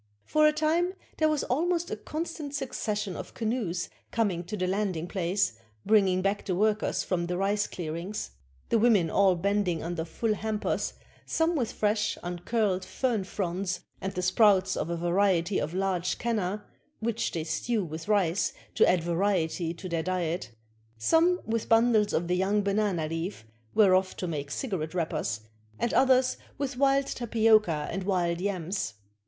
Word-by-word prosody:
For 305 0 +4
a - - +5
time 325 +4 +1 0.2
there 310 -1 +4
was 305 -2 0
almost 340 +6 0
a - - 0
constant 305 +4 -5
succession 210 - -2
of - - -8
canoes 215 -7 -1 0.2
coming 200 -7 0
to 210 +4 -5
the 185 - 0
landing 185 -3 -1
place, 185 - 0 0.3
bringing 195 -3 +4
back 195 +1 0
the 185 - -1
workers 215 +2 +1
from 175 -2 -1
the 180 0 -2
rice 205 +2 +1
clearings. 170 - -5 0.4
The 230 - +3
women 210 -8 +4
all 195 -2 +4
bending 190 -2 0
under 170 0 -3
full 215 +7 -1
hampers, 215 +1 -2 0.3
some 330 +1 +1
with 245 -7 0
fresh, 210 0 0
uncurled 185 +2 -1
fern 230 -2 -1
fronds, 185 -1 -2 0.2
and 190 - -2
the 180 -2 -3
sprouts 190 0 +4
of - - -2
a 170 - -1
variety 180 +1 +2
of 155 +4 -3
large 185 -2 0
canna, 210 -4 -2 0.3
which 230 0 -1
they 165 - -2
stew 195 +7 -1
with 160 +2 -7
rice 200 -4 +2 0.2
to - - +5
add 180 -2 +2
variety 170 -2 0
to 185 +3 -7
their 170 -2 -1
diet; 175 -6 -2 0.5
some 335 - +3
with 225 0 -2
bundles 225 -2 +4
of 170 +1 0
the 180 - +1
young 200 +3 +1
banana 200 -5 0
leaf, 165 - -4 0.3
whereof 190 -2 +4
to 180 - -3
make 145 -4 -4
cigarette 180 - -3
wrappers, 155 -10 -1 0.4
and 235 - -1
others 260 -1 +4 0.2
with 280 -1 -2
wild 275 +1 +3
tapioca 220 - +2
and 195 - -3
Vv'ild 175 -3 0
yams. 185 - -2
195 Hz, 160 wpm, -28 LUFS, 175-225 Hz, 0.5 s, a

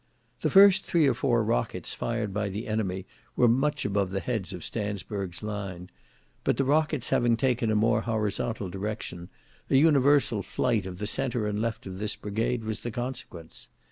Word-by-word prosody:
"The - - 0
first 200 0 +7
three 170 -4 +2
or 135 - +4
four 120 -1 +1
rockets - - -1
fired 115 -4 -2
by 105 0 -1
the 100 +3 -5
enemy 95 -4 -2 0.3
were 125 - +4
much 135 +6 +1
above 100 -2 0
the 95 +1 -2
heads 110 -4 -3
of 90 -4 -7
Stansburg's 100 -3 -4
line; 100 -4 -5 0.5
but - - +1
the 135 - +2
rockets 150 -1 +1
having 120 -1 +3
taken 120 -2 +1
a 110 - +2
more 105 +2 +3
horizontal 110 -1 -2
direction, 95 -3 -5 0.4
an - - +3
universal 140 -6 +4
flight 110 -2 0
of 90 -1 -7
the 105 - -4
centre 120 -1 -1
and 105 0 -1
left 115 -1 -3
of 95 -1 -7
this 105 0 -2
brigade 115 +3 -2
was 110 0 -3
the 120 - -5
consequence. 120 -9 -6
110 Hz, 175 wpm, -27 LUFS, 100-125 Hz, 0.5 s, first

